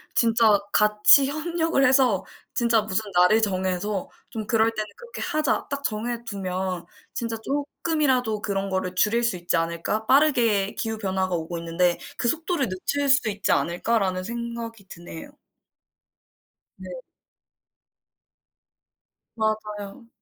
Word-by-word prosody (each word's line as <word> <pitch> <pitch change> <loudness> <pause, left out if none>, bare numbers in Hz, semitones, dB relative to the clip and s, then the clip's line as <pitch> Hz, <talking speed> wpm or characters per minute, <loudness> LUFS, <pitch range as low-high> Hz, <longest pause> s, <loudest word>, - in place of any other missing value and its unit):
진짜 225 -3 +4
같이 210 +6 +5
협력을 325 0 0
해서 255 -7 +3 0.3
진짜 235 -2 +3
무슨 215 +1 -2
날을 180 +5 +5
정해서 190 0 -1 0.2
좀 220 -2 -5
그럴 225 0 +3
때는 215 -1 -3
'그렇게 475 0 -9
하자.' 305 -2 0
딱 280 0 -4
정해두면 200 -6 -3 0.3
진짜 230 -1 -3
쪼끔이라도 280 -6 0
그런 195 -1 -2
거를 185 -1 -2
줄일 230 +5 +2
수 230 -6 0
있지 175 0 -1
않을까 170 +6 -2
빠르게 235 -8 +3
기후 225 -1 -3
변화가 190 -3 -1
오고 170 +1 -4
있는데 170 +1 +1 0.2
그 240 - -1
속도를 325 - 0
늦출 280 +10 -2
수 265 -5 +4
있지 205 0 -1
않을까라는 185 +1 0
생각이 235 -2 -6
드네요. 170 -2 -10 1.4
네. - - -10 2.5
맞아요. 215 0 -3
215 Hz, 265 characters per minute, -24 LUFS, 190-240 Hz, 2.5 s, 같이